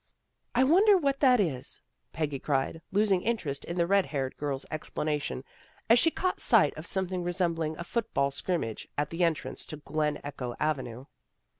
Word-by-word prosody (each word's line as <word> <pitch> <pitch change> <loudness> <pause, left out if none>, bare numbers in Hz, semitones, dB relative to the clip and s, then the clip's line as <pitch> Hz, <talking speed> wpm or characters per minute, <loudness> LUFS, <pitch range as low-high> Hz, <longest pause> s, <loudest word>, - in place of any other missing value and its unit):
" - - -51
I 255 - +5
wonder 385 +9 +6
what 275 -5 0
that 255 -4 +5
is," 150 -11 -1 0.3
Peggy 150 -4 -2
cried, 140 +3 -1
losing 200 -2 +3
interest 170 -13 -2
in 170 - -5
the 170 - +3
red 195 0 +3
haired 135 -2 -3
girl's 140 -2 -3
explanation, 150 -3 -3 0.5
as 235 - +8
she 330 - +5
caught 370 +3 -1
sight - - +5
of - - -7
something 185 -2 -1
resembling 170 -3 -1
a - - -5
football 175 -9 -1
scrimmage 135 - -2
at 145 0 -1
the 170 +2 0
entrance 165 -3 -1
to 155 - -5
Glen 150 0 -1
Echo 130 -4 -5
Avenue. 130 -5 -2
165 Hz, 170 wpm, -29 LUFS, 145-200 Hz, 0.5 s, as